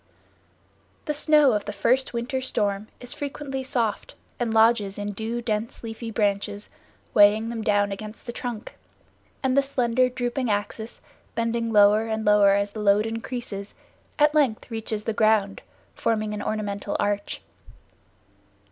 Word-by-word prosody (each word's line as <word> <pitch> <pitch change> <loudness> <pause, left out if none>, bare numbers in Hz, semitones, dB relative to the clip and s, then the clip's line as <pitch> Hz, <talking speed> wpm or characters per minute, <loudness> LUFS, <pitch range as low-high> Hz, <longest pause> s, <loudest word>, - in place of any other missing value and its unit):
The 300 - -1
snow 300 -2 +4
of 210 -1 -1
the 205 - -3
first 235 +6 +1
winter 245 +3 -2
storm 205 -5 0
is 245 +2 -3
frequently 285 -2 -4
soft, 235 -5 -2 0.2
and 240 -2 0
lodges 220 -3 +3
in 205 0 -3
due 225 +3 -4
dense 220 +1 -3
leafy 225 0 -6
branches, 205 -1 -1 0.4
weighing 210 +2 +5
them 230 -1 -4
down 205 -2 +2
against 215 +2 -8
the 240 - -4
trunk, 235 -2 -6 0.7
and 260 -1 +2
the 280 - +6
slender, 255 -2 +1
drooping 245 0 -2
axis, 210 +2 -3 0.3
bending 230 0 -1
lower 210 +1 +5
and 220 0 -2
lower 205 -1 +5
as 200 0 0
the 215 - -7
load 210 0 +3
increases, 225 -3 -5 0.4
at 295 0 +4
length 265 -6 +1
reaches 220 -1 -3
the 225 - -2
ground, 215 -2 +2 0.3
forming 215 -2 -1
an 210 - -4
ornamental 205 -1 -3
arch. 205 0 -2
220 Hz, 145 wpm, -25 LUFS, 205-245 Hz, 0.7 s, the